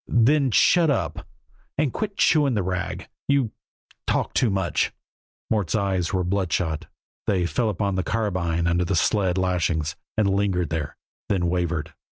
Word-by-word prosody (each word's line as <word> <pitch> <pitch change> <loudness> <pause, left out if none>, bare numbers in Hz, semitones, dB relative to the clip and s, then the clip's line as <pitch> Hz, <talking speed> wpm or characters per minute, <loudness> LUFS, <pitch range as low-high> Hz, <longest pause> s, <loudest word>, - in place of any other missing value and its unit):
"Then 135 +4 +4
shut 165 - +4
up, 85 - -1 0.5
and 145 -4 +1
quit 205 -2 -3
chewing 145 -5 +4
the 100 - +1
rag. 90 0 -3 0.2
You 140 -6 +2 0.6
talk - - 0
too 125 - +3
much." 95 -3 0 0.6
Mort's 105 -5 +1
eyes 95 -4 0
were 95 -1 +1
bloodshot; 90 -4 -1 0.4
they 95 -4 +2
fell 110 +5 0
upon 100 0 -1
the 95 0 0
carbine 85 -5 -1
under 85 +1 +2
the 90 +2 0
sled 90 +2 +2
lashings, 85 -4 0 0.2
and 105 -2 +3
lingered 95 -4 +1
there, 75 -3 -3 0.3
then 90 -3 +1
wavered. 85 -3 -1
95 Hz, 150 wpm, -24 LUFS, 85-110 Hz, 0.6 s, Then